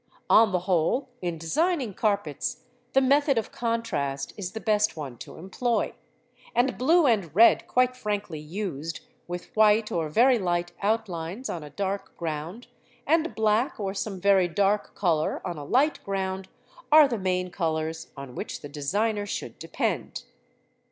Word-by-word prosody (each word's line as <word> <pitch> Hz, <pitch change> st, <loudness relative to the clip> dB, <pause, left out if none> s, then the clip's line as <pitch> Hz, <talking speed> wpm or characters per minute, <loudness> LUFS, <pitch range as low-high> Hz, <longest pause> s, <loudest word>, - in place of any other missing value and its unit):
On 220 Hz, -2 st, +7 dB
the 180 Hz, -1 st, 0 dB
whole, 180 Hz, -, +1 dB
in 175 Hz, -2 st, -2 dB
designing 270 Hz, -, 0 dB
carpets 205 Hz, 0 st, -1 dB, 0.3 s
the 270 Hz, -, +5 dB
method 280 Hz, 0 st, +3 dB
of 225 Hz, -, -1 dB
contrast 230 Hz, -, -2 dB
is 185 Hz, -3 st, -5 dB
the 220 Hz, -, -4 dB
best 210 Hz, -4 st, +1 dB
one 140 Hz, -5 st, -6 dB
to -, -, -10 dB
employ, 230 Hz, +7 st, -1 dB, 0.6 s
and 245 Hz, +1 st, +2 dB
blue 325 Hz, +6 st, +4 dB
and 200 Hz, -, +1 dB
red, 230 Hz, +3 st, +6 dB
quite 255 Hz, 0 st, +2 dB
frankly 205 Hz, -9 st, -3 dB
used, 165 Hz, -1 st, -5 dB, 0.3 s
with 175 Hz, 0 st, -7 dB
white 215 Hz, 0 st, +4 dB
or 160 Hz, -2 st, -1 dB
very 240 Hz, -, +4 dB
light 175 Hz, -2 st, -1 dB
outlines 200 Hz, 0 st, -2 dB
on 170 Hz, -, -4 dB
a 150 Hz, -, -9 dB
dark 195 Hz, +4 st, -4 dB
ground, 165 Hz, +7 st, -5 dB, 0.4 s
and 325 Hz, +2 st, +1 dB
black 220 Hz, +4 st, +1 dB
or 195 Hz, -2 st, -2 dB
some 195 Hz, -1 st, -4 dB
very 195 Hz, -1 st, +4 dB
dark 200 Hz, +4 st, 0 dB
colour 165 Hz, -5 st, +1 dB
on 175 Hz, -4 st, -4 dB
a -, -, -6 dB
light 270 Hz, -, +1 dB
ground, 190 Hz, -1 st, -3 dB, 0.4 s
are 305 Hz, -1 st, +9 dB
the 235 Hz, -5 st, -3 dB
main 180 Hz, -1 st, -1 dB
colours 160 Hz, -2 st, -2 dB
on 140 Hz, -2 st, -8 dB
which -, -, -6 dB
the 145 Hz, -, -8 dB
designer 205 Hz, +9 st, -1 dB
should -, -, -5 dB
depend. -, -, -3 dB
200 Hz, 155 wpm, -26 LUFS, 170-230 Hz, 0.6 s, are